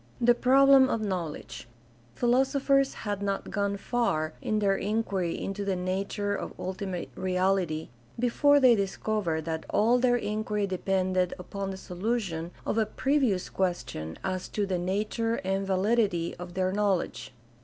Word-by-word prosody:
The 240 Hz, 0 st, +5 dB
problem 270 Hz, +2 st, +6 dB
of 230 Hz, -, 0 dB
knowledge. 180 Hz, -, -4 dB, 0.3 s
— 120 Hz, 0 st, -30 dB
Philosophers 270 Hz, +2 st, +2 dB
had 205 Hz, -1 st, -2 dB
not 200 Hz, -1 st, -2 dB
gone 200 Hz, 0 st, -1 dB
far 175 Hz, -9 st, -1 dB
in 215 Hz, -, 0 dB
their 200 Hz, -2 st, +2 dB
inquiry 200 Hz, -4 st, -1 dB
into 195 Hz, +1 st, -3 dB
the 195 Hz, -1 st, 0 dB
nature 195 Hz, +3 st, -2 dB
of -, -, -6 dB
ultimate 185 Hz, -1 st, -4 dB
reality 185 Hz, -3 st, 0 dB, 0.3 s
before 285 Hz, +4 st, +4 dB
they 255 Hz, -3 st, +7 dB
discovered 195 Hz, -5 st, -1 dB
that 160 Hz, -1 st, -3 dB
all 235 Hz, +4 st, +3 dB
their 245 Hz, -1 st, +3 dB
inquiry 210 Hz, -2 st, -1 dB
depended 185 Hz, -1 st, 0 dB
upon 195 Hz, +1 st, -5 dB
the 190 Hz, -, -5 dB
solu 200 Hz, +7 st, -2 dB
tion 165 Hz, -5 st, -5 dB, 0.2 s
of 225 Hz, -, 0 dB
a 220 Hz, -, +2 dB
previous 260 Hz, -7 st, +1 dB
question 175 Hz, -, -3 dB
as 185 Hz, -1 st, -2 dB
to 210 Hz, -, -1 dB
the 185 Hz, -2 st, -1 dB
nature 210 Hz, +5 st, -1 dB
and 195 Hz, +1 st, -1 dB
validity 195 Hz, -3 st, +1 dB
of 175 Hz, 0 st, -9 dB
their 185 Hz, 0 st, +1 dB
knowledge. 200 Hz, -7 st, -1 dB
195 Hz, 150 wpm, -28 LUFS, 185-225 Hz, 0.3 s, they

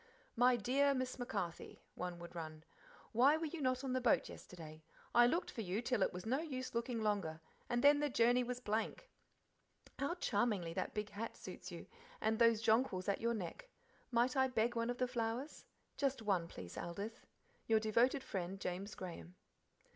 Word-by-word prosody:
"My 245 Hz, +1 st, +5 dB
dear' 275 Hz, +5 st, +3 dB
Miss 255 Hz, 0 st, -2 dB
MacCarthy," 195 Hz, -8 st, -4 dB
one 180 Hz, -1 st, -4 dB
would 170 Hz, 0 st, -9 dB
run 155 Hz, -2 st, -6 dB, 0.5 s
"Why 265 Hz, +7 st, +5 dB
were 325 Hz, -, -2 dB
you 315 Hz, +1 st, -5 dB
not 255 Hz, 0 st, +1 dB
on 260 Hz, -2 st, -1 dB
the 255 Hz, -, +1 dB
boat 240 Hz, -, +3 dB
yesterday? 160 Hz, -3 st, -10 dB, 0.3 s
I 240 Hz, 0 st, +7 dB
looked 345 Hz, +8 st, 0 dB
for 230 Hz, -, -4 dB
you 195 Hz, 0 st, -1 dB
till 245 Hz, -2 st, 0 dB
it -, -, +3 dB
was 180 Hz, 0 st, -7 dB
no 255 Hz, +5 st, +1 dB
use 265 Hz, -5 st, -4 dB
looking 235 Hz, -1 st, -1 dB
longer, 195 Hz, -7 st, 0 dB, 0.3 s
and 240 Hz, 0 st, +1 dB
then 290 Hz, 0 st, +7 dB
the 295 Hz, 0 st, +1 dB
journey 245 Hz, 0 st, +4 dB
was 245 Hz, 0 st, -3 dB
blank. 225 Hz, -, -2 dB, 0.9 s
How 280 Hz, +6 st, 0 dB
charmingly 205 Hz, -, 0 dB
that -, -, -3 dB
big 210 Hz, -1 st, -2 dB
hat 220 Hz, +3 st, -5 dB
suits -, -, -8 dB
you, -, -, -7 dB, 0.3 s
and 220 Hz, 0 st, +1 dB
those 230 Hz, -2 st, +5 dB
jonquils 220 Hz, -5 st, +2 dB
at 200 Hz, -, 0 dB
your 235 Hz, +1 st, +1 dB
neck. 225 Hz, -, -6 dB, 0.4 s
Might 245 Hz, +2 st, +2 dB
I 265 Hz, 0 st, +4 dB
beg 240 Hz, -1 st, +1 dB
one 230 Hz, 0 st, 0 dB
of 245 Hz, -, -1 dB
the 255 Hz, -, +1 dB
flowers? 240 Hz, +3 st, -3 dB, 0.3 s
just 275 Hz, -4 st, 0 dB
one, 190 Hz, -5 st, +1 dB
please, 90 Hz, -, -8 dB
Aldith. 200 Hz, +7 st, -5 dB, 0.4 s
Your 220 Hz, -1 st, +5 dB
devoted 235 Hz, +5 st, +3 dB
friend, 190 Hz, 0 st, -4 dB
James 195 Hz, +3 st, -4 dB
Graham." 180 Hz, -1 st, -8 dB
230 Hz, 185 wpm, -38 LUFS, 195-255 Hz, 0.9 s, I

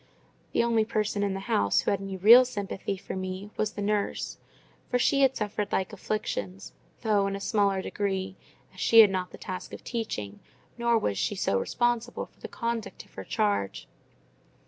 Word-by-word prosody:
The -, -, +3 dB
only 230 Hz, -2 st, +3 dB
person 215 Hz, -1 st, -1 dB
in 200 Hz, -1 st, 0 dB
the 195 Hz, -, -4 dB
house 100 Hz, -, +2 dB
who -, -, 0 dB
had 200 Hz, -1 st, -1 dB
any 195 Hz, -1 st, -5 dB
real 230 Hz, +7 st, +9 dB
sympathy 200 Hz, -4 st, -4 dB
for -, -, -7 dB
me 185 Hz, +2 st, -5 dB
was 215 Hz, 0 st, -1 dB
the 205 Hz, -, -4 dB
nurse; 205 Hz, 0 st, -1 dB, 0.5 s
for 250 Hz, -, +2 dB
she 275 Hz, +3 st, +3 dB
had 265 Hz, -1 st, +4 dB
suffered 210 Hz, -1 st, -2 dB
like 190 Hz, -, -1 dB
afflictions, 95 Hz, -, -4 dB, 0.3 s
though 205 Hz, -3 st, +2 dB
in 195 Hz, -, -2 dB
a -, -, -4 dB
smaller 200 Hz, -2 st, +1 dB
degree; 190 Hz, -2 st, -2 dB, 0.4 s
as 185 Hz, -, -14 dB
she 230 Hz, +3 st, +8 dB
had 210 Hz, -3 st, +6 dB
not 185 Hz, -1 st, -2 dB
the -, -, -11 dB
task 185 Hz, -1 st, -7 dB
of -, -, -8 dB
teaching, 105 Hz, -, -4 dB, 0.4 s
nor 235 Hz, -1 st, +2 dB
was 100 Hz, -, -1 dB
she 205 Hz, -, 0 dB
so 100 Hz, -, +1 dB
responsible 240 Hz, -, -1 dB
for -, -, -29 dB
the -, -, -7 dB
conduct 230 Hz, -1 st, -4 dB
of -, -, -26 dB
her -, -, -7 dB
charge. 205 Hz, -, -1 dB
205 Hz, 190 wpm, -28 LUFS, 190-225 Hz, 0.5 s, real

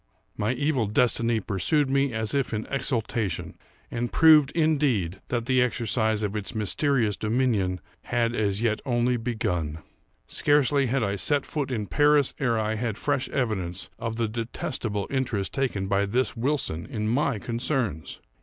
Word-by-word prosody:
My 105 Hz, +4 st, 0 dB
evil 130 Hz, -3 st, 0 dB
destiny 115 Hz, +1 st, +2 dB
pursued 135 Hz, -, +1 dB
me 135 Hz, 0 st, +1 dB
as 110 Hz, -1 st, -1 dB
if 135 Hz, -5 st, 0 dB
in 110 Hz, -, -3 dB
exultation, 115 Hz, -, -2 dB, 0.4 s
and 120 Hz, 0 st, -2 dB
proved, 155 Hz, -3 st, +6 dB
indeed, 140 Hz, -, +1 dB
that 120 Hz, -2 st, -2 dB
the 130 Hz, 0 st, +3 dB
exercise 110 Hz, -3 st, 0 dB
of 105 Hz, 0 st, -2 dB
its 105 Hz, +1 st, -4 dB
mysterious 110 Hz, -, +1 dB
dominion 110 Hz, -5 st, 0 dB, 0.3 s
had 120 Hz, -1 st, 0 dB
as 105 Hz, -1 st, 0 dB
yet 110 Hz, -2 st, +1 dB
only 125 Hz, -1 st, +1 dB
begun. 90 Hz, -10 st, -2 dB, 0.5 s
Scarcely 145 Hz, -1 st, +2 dB
had 130 Hz, 0 st, 0 dB
I 100 Hz, -1 st, -1 dB
set 140 Hz, +10 st, +1 dB
foot 145 Hz, -3 st, -3 dB
in 110 Hz, -5 st, -2 dB
Paris 145 Hz, +2 st, +3 dB
ere 120 Hz, -5 st, +1 dB
I 110 Hz, 0 st, 0 dB
had 115 Hz, -2 st, -2 dB
fresh 145 Hz, 0 st, -1 dB
evidence 95 Hz, -8 st, -2 dB
of 115 Hz, -1 st, -3 dB
the 115 Hz, -1 st, 0 dB
detestable 110 Hz, -2 st, -3 dB
interest 125 Hz, -7 st, -1 dB
taken 125 Hz, -8 st, -1 dB
by 100 Hz, +1 st, +1 dB
this 125 Hz, +6 st, 0 dB
Wilson 120 Hz, -, -2 dB
in 110 Hz, -6 st, -3 dB
my 120 Hz, 0 st, +1 dB
concerns. 115 Hz, -, -2 dB
115 Hz, 155 wpm, -26 LUFS, 105-135 Hz, 0.5 s, proved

